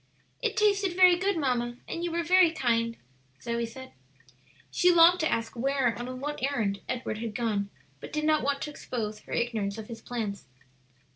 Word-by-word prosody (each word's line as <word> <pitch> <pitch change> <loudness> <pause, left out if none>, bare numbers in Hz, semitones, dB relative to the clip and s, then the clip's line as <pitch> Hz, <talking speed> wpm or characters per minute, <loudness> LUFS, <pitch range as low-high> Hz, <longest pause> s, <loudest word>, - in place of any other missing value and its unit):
"It 455 -3 -1
tasted 400 -4 +2
very 365 -1 +7
good, 380 +1 0
mamma, 245 -4 -1
and 340 - -4
you 345 - -1
were 340 +1 -1
very 365 0 +5
kind," 230 -6 0 0.4
Zoe 235 0 -2
said. 260 +3 -11 0.8
She 360 - +4
longed 345 +1 +7
to 315 - +1
ask 230 +1 -2
where 270 +1 +1
and 240 +2 -5
on 255 0 -6
what 295 +2 -4
errand 220 -8 -1
Edward 240 -3 -3
had 225 -2 -5
gone, 205 -4 -1 0.3
but - - -9
did 305 0 -2
not 310 -1 +3
want 280 +1 -1
to 300 - -5
expose 215 -7 -5
her - - -16
ignorance 220 -4 -1
of 220 -1 -8
his 230 -1 -8
plans. 215 - -5
255 Hz, 190 wpm, -28 LUFS, 230-330 Hz, 0.8 s, very